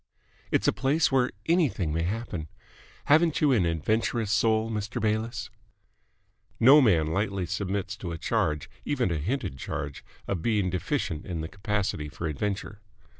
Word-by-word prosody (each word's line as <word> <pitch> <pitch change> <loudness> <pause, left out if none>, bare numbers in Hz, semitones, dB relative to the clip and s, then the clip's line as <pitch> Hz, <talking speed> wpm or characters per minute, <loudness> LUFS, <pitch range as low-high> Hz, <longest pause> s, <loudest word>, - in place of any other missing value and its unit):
It's - - +1
a - - +4
place 140 +6 +2
where 130 -1 +3 0.2
anything 145 - +1
may 85 - 0
happen. 90 -3 -3 0.6
Haven't 155 +2 +4
you 150 -2 +4
an 105 -9 +3
adventurous 110 +6 0
soul, 110 0 +2
Mr. 110 +2 -3
Bayliss?" 110 +1 -1 1.1
No 135 +6 +8
man 90 - +4
lightly 95 +3 -1
submits 100 +2 -2
to 90 -4 -5
a 85 - -4
charge, 75 -2 0 0.2
even 130 -10 0
a 85 - 0
hinted 85 - -3
charge, - - -5 0.2
of 95 -5 -2
being 105 -4 +1
deficient 80 -3 -2
in 85 -3 -3
the 80 - -4
capacity 95 -5 -2
for 85 - -6
adventure. 100 +6 -3
100 Hz, 150 wpm, -27 LUFS, 85-115 Hz, 1.1 s, No